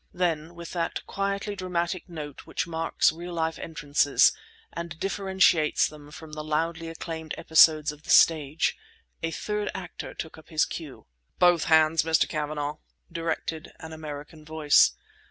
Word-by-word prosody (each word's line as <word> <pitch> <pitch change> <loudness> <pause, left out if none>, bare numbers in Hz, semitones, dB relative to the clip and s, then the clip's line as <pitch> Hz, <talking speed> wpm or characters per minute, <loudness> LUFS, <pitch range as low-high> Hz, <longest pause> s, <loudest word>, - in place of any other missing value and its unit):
Then, 170 -2 -1
with 170 -1 -8
that 170 -2 -2
quietly 200 +1 -2
dramatic 180 -1 -2
note 150 -4 -8
which - - -2
marks 165 -2 +1
real 175 +2 -8
life 160 0 -1
entrances 145 -3 +3 0.4
and 170 -1 -6
differentiates 190 -5 +2
them 150 -1 -12
from 155 +2 -11
the 155 0 -5
loudly 160 +2 -1
acclaimed 160 -1 -6
episodes 160 -1 +5
of 150 0 -14
the - - -15
stage, 155 -1 +4 0.5
a 165 - -1
third 210 +5 -3
actor 190 -2 -7
took 160 -1 -7
up 155 - -18
his 155 -2 +2
cue. 155 -5 -8 0.3
"Both 175 -2 +4
hands, 160 0 +5
Mr. 160 0 +2
Cavanagh!" 150 -1 -3 0.3
directed 165 -1 -3
an 160 0 -9
American 155 0 -8
voice. 155 -1 +4
160 Hz, 145 wpm, -27 LUFS, 155-170 Hz, 0.5 s, episodes